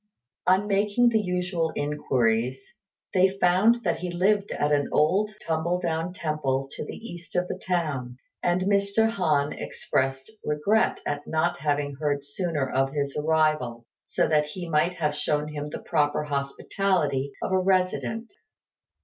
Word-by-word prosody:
On 185 +2 +4
making 210 +4 +3
the 225 -2 +2
usual 180 -3 -1
inquiries, 130 -4 0 0.5
they 190 +1 +3
found 195 +7 +4
that 170 -3 0
he 180 +1 -3
lived 200 +4 +1
at 150 - 0
an 145 -1 +2
old 190 +8 +3 0.2
tumble 165 +2 0
down 165 0 -1
temple 150 -6 -1
to - - -5
the - - -7
east 175 -8 -10
of 180 0 +1
the 185 - -5
town, 145 -9 -2 0.2
and 175 +1 +1
Mr. 200 +2 +2
Han 150 -9 +1
expressed 135 +5 -2
regret 175 +10 +1
at 145 0 -3
not 170 +2 0
having 145 -2 -1
heard 145 -2 -1
sooner 150 -2 -2
of 135 +1 0
his 140 -2 -2
arrival, 150 -6 +1 0.2
so - - 0
that 150 -1 +3
he 175 +3 -6
might 165 +2 +2
have 150 -4 -1
shown 150 0 0
him 150 -1 -5
the - - -5
proper 145 0 +1
hospitality 140 0 -1
of - - -2
a 190 - +3
resident. 190 +4 0
160 Hz, 150 wpm, -26 LUFS, 145-185 Hz, 0.5 s, On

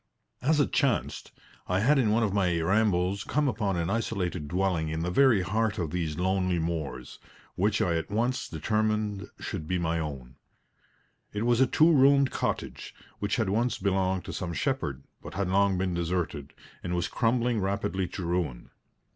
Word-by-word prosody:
As 150 +3 +2
it 145 - +1
chanced, 135 -4 0 0.4
I 90 +1 +1
had 135 +5 +4
in 115 -5 +2
one 115 +2 +2
of 105 -3 0
my 90 -4 +1
rambles 95 +1 +1
come 150 +3 0
upon 100 -7 -1
an 85 +2 -1
isolated 95 -8 -2
dwelling 90 -1 0
in 80 +1 -2
the 90 +2 -1
very 120 -4 +4
heart 110 +2 0
of 85 -4 -2
these 80 -3 -2
lonely 90 0 +1
moors, 80 -6 -4 0.3
which 105 +3 +1
I 85 -2 +1
at 80 - -4
once 120 +5 -1
determined 105 +3 -1
should 75 - -5
be 90 - 0
my 85 -1 0
own. 70 -6 -6 1.0
It 105 +1 -2
was 120 +1 +3
a 130 - +5
two 160 +6 +4
roomed 140 -1 +5
cottage, - - -3 0.2
which 100 - 0
had 110 -5 0
once 115 +4 +1
belonged 95 -1 0
to - - -6
some 85 -2 -4
shepherd, 80 - -2 0.2
but - - -9
had 100 -1 -1
long 100 0 +3
been 90 -1 -1
deserted, 85 -4 -2 0.3
and 90 0 -3
was 85 - 0
crumbling 120 -1 +1
rapidly 95 -1 -1
to 90 0 -6
ruin. 85 -8 -2
95 Hz, 175 wpm, -28 LUFS, 85-110 Hz, 1.0 s, a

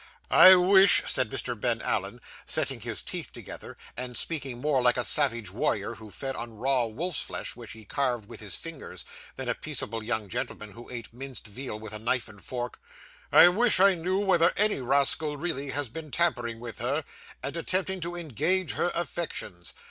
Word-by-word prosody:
'I 185 0 +10
wish,' 190 +1 +6
said 130 -4 +1
Mr. 120 - -3
Ben 120 -2 0
Allen, 105 +4 -2 0.3
setting - - +1
his - - 0
teeth - - -2
together, - - -9 0.2
and 125 0 -4
speaking 140 -7 -1
more 140 -1 +1
like 125 0 +3
a 125 - 0
savage 120 - +2
warrior 105 +1 -1
who 110 -1 -12
fed 135 +5 -5
on 115 -1 -7
raw 125 +2 +1
wolf's 150 +10 -2
flesh - - -5
which 120 -2 -9
he 110 -1 -12
carved 125 -6 -1
with - - -10
his 105 -3 -3
fingers, 165 -4 -7 0.3
than - - -6
a - - +1
peaceable 115 +1 -2
young 110 -2 -2
gentleman 120 -2 -5
who 115 +3 -12
ate 120 -2 -8
minced 130 -1 -5
veal 110 +1 -6
with 110 -1 -8
a 110 - -2
knife 120 +2 0
and 100 -4 -14
fork 120 +4 -5 0.5
'I 175 - +9
wish 220 +3 +3
I 195 +1 +6
knew 180 +2 -1
whether 180 -4 +4
any 210 -8 +2
rascal 140 +3 +1
really 145 -3 -3
has 145 0 -1
been 155 +6 -8
tampering 120 -8 0
with 115 -1 -8
her, 135 +7 -1 0.4
and 140 - -3
attempting 185 +3 0
to 170 +1 -4
engage 170 - 0
her 175 - 0
affections. 160 - -4
130 Hz, 185 wpm, -27 LUFS, 115-165 Hz, 0.5 s, I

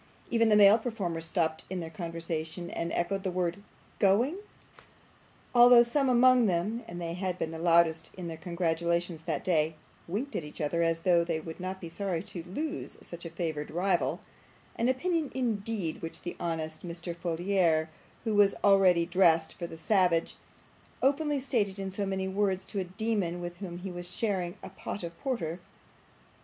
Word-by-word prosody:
Even 230 -1 +4
the 210 - +5
male 205 +2 +8
performers 190 -9 -3
stopped 160 -2 0
in 185 0 -3
their 165 -1 -6
conversation, 165 0 -5
and 170 - -3
echoed 195 +3 0
the 190 - -2
word 180 +1 -1 0.4
'Going!' 235 - +3 1.1
although 245 0 +8
some 265 +3 +1
among 250 -1 +6
them 205 +6 -1
(and 175 - -7
they 170 -1 -3
had 180 0 -2
been 160 - -2
the 160 - -6
loudest 165 -1 +3
in 180 -2 -5
their 165 - -5
congratulations 170 -1 -1
that 155 -4 -2
day) 160 -3 +1 0.3
winked 230 +11 -3
at - - -1
each 150 - -9
other 160 +3 0
as 165 0 +1
though 170 -1 +4
they 165 -2 -1
would 160 +2 -8
not 185 +1 -4
be 170 - -7
sorry 175 -1 -2
to 175 - -7
lose 295 - -5
such 170 0 -8
a - - -4
favoured 160 -3 -3
rival; 185 +4 0 0.5
an 235 +2 +1
opinion, 320 +3 0
indeed, 220 -8 -2
which 165 - -6
the 175 - -5
honest 160 -2 -3
Mr. 170 0 -5
Folair, 170 -1 +1 0.4
who 225 -2 -1
was 205 -1 +5
ready 190 -4 +5
dressed 170 -3 +3
for 170 - -6
the 165 - -9
savage, 180 -2 +2 0.7
openly 290 +1 +2
stated 225 -7 0
in 195 -1 -4
so 200 +1 -2
many 190 0 -1
words 190 -1 0
to 205 - -4
a - - 0
demon 190 -2 -1
with 175 0 -6
whom 180 -3 -6
he 185 +1 -6
was 175 0 -6
sharing 185 -3 -2
a - - -7
pot 195 +1 -6
of 170 0 -6
porter. 180 - -2
180 Hz, 175 wpm, -30 LUFS, 170-205 Hz, 1.1 s, male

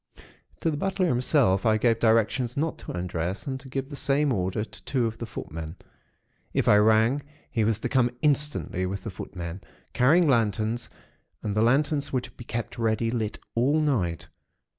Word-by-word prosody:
To 165 - +1
the 150 - -3
butler 195 +2 0
himself, 125 - +2
I 110 -1 +3
gave 115 0 +2
directions 115 +2 +2
not 160 +2 -1
to - - -7
undress 90 +1 -3
and 130 -1 -3
to 135 - -13
give 135 0 -3
the 145 - -7
same 140 0 +2
order 95 +1 -1
to - - -12
two 130 -4 0
of 110 0 -3
the 115 - -5
footmen. 80 -5 -7 0.8
If - - +1
I 105 - +7
rang, 110 +6 +4 0.3
he 115 - +1
was 110 0 +1
to - - -1
come 125 -2 +3
instantly, 145 -10 +1
with 100 +2 -4
the 110 - -5
footmen, 90 0 -7 0.3
carrying 160 +7 +4
lanterns; 115 -2 +1 0.5
and 105 -1 -2
the 110 - +3
lanterns 140 +5 +2
were 130 - +1
to - - -10
be - - -11
kept 120 +1 -4
ready 115 0 +1
lit 110 -3 -2 0.2
all 135 +7 +2
night. 105 - 0
115 Hz, 185 wpm, -26 LUFS, 105-135 Hz, 0.8 s, I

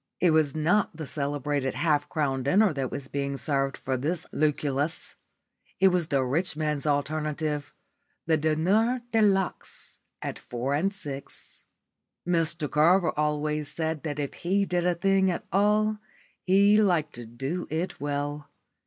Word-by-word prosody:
It 175 -2 +4
was 155 -2 +2
not 160 +3 +1
the 160 - -5
celebrated 140 -2 -2
half 145 +1 +1
crown 140 -5 0
dinner 185 +8 +3
that 135 -3 -2
was 135 - -6
being 140 0 -3
served 135 -2 -1
for 130 -1 -2
this 155 +6 -2
Lucullus; 150 0 -1 0.7
it 190 - +6
was 180 -3 0
the 140 -3 +1
rich 150 +6 0
man's 150 -1 -1
alternative 150 0 -1 0.5
the 160 - +3
diner 190 +11 +2
de 225 - +3
luxe 195 -3 0 0.2
at - - -5
four 125 +3 -3
and 175 +7 +1
six. 140 -8 -7 0.7
Mr 165 -2 +2
Carver 165 +4 +4
always 150 0 -1
said 160 -1 -2
that 150 -3 -4
if 145 -2 -3
he 195 +3 0
did 175 -1 0
a 180 - +2
thing 195 +1 +3
at 175 - -3
all 210 +2 +2 0.5
he 200 +3 +5
liked 170 -7 +1
to 120 -1 -5
do 135 +10 -4
it 165 +4 -3
well. 145 0 -3
155 Hz, 150 wpm, -27 LUFS, 145-180 Hz, 0.7 s, it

